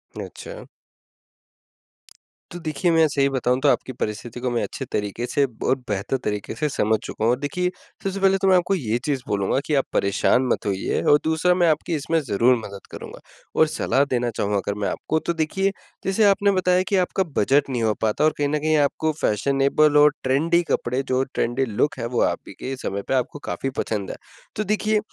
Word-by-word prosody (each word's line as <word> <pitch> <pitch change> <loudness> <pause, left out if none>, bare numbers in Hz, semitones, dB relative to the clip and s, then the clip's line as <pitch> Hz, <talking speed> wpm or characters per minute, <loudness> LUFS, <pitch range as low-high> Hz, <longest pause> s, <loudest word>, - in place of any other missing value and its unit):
अच्छा। - - -8 1.8
तो 175 - -7
देखिए, 155 +3 0
मैं 160 -1 +5
सही 140 -1 +1
बताऊँ 125 -1 0
तो 145 - +4
आपकी 130 - 0
परिस्थिति 110 +2 -5
को 125 0 -1
मैं 120 - 0
अच्छे 135 - -5
तरीके 105 +3 -2
से 140 - +1 0.2
और 130 - +4
बेहतर 105 +6 -1
तरीके 105 -1 -3
से 150 -1 -1
समझ 110 -5 +1
चुका - - -5
हूँ 115 - +4
और 125 - 0
देखिए 180 +6 -1 0.3
सबसे 195 0 -2
पहले 195 0 +4
तो 195 - +2
मैं 185 - +6
आपको 180 +2 +1
ये 120 - -1
चीज़ 140 -3 -1
बोलूँगा, 100 +5 0
कि 155 - -2
आप 135 - +2
परेशान 100 +6 +2
मत - - -1
होइए 95 -2 -1
और 145 - +5
दूसरा 160 +3 +2
मैं 175 -2 +3
आपकी 160 +2 0
इसमें 160 +2 0
ज़रूर 125 -1 +3
मदद 100 -3 -9
करूँगा। - - -9 0.4
और 160 - +5
सलाह 140 -2 +1
देना 120 -1 0
चाहूँ 105 0 0
अगर 100 +1 -2
मैं 100 - -1
आपको, 160 - -1
तो 170 - -2
देखिए 170 +5 0 0.3
जैसे 195 +3 +2
आपने 200 0 +4
बताया 185 -1 +2
कि 200 - +1
आपका 185 +1 +1
बजट 140 +6 +3
नहीं 125 -3 -1
हो 110 -1 +2
पाता 110 +6 +1
और 155 - +4
कहीं 145 -1 +1
न 150 - 0
कहीं 155 +1 +2
आपको 150 +2 +1
फैशनेबल 140 +6 +2
और 150 0 +6
ट्रेंडी 160 +7 +2
कपड़े 125 +3 0
जो, 130 0 0
ट्रेंडी 130 0 -1
लूक 125 +5 -1
हैं 115 - -2
वो - - +3
आप - - +1
ही - - -9
के 135 - -4
समय 100 -6 -4
पे - - 0
आपको 130 +2 -1
काफ़ी 135 - -2
पसंद 105 -3 -3
हैं। 215 - -8
देखिए 215 0 +1
140 Hz, 205 wpm, -23 LUFS, 120-165 Hz, 1.8 s, मैं